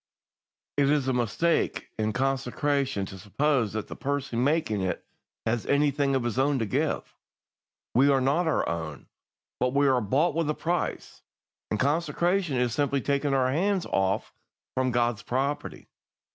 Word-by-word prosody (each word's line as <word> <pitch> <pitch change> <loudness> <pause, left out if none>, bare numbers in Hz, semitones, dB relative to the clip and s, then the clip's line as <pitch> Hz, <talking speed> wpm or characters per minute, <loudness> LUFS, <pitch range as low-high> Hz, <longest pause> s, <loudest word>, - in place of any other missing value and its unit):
"It 140 -1 +4
is 145 -3 +2
a 130 - +2
mistake 125 +8 0
in 110 0 +1
consecration 135 -2 0
to 95 0 -9
suppose 115 +2 0
that 110 -1 -3
the - - -7
person 135 -4 -2
making 140 -8 +1
it 95 -1 -2 0.4
has 115 0 -1
anything 140 -1 +2
of 130 - +1
his 120 +1 -1
own 140 +1 +3
to 115 - 0
give. 100 - -1 0.8
We 135 +4 +5
are 135 -1 +4
not 145 +7 +2
our 160 - +1
own, 80 -4 -5 0.5
but 125 +1 0
we 140 0 +4
are 130 -2 +3
bought 140 - +2
with 165 -1 0
a 150 - 0
price, 175 +1 -3 0.5
and 105 - -1
consecration 165 +2 +1
is 125 -2 +1
simply 140 -1 +1
taking 140 0 +1
our 130 -1 +2
hands 190 +5 +1
off 95 0 0 0.4
from 130 0 +1
God's 120 -2 +1
property. 135 +4 -3
135 Hz, 160 wpm, -27 LUFS, 120-145 Hz, 0.8 s, We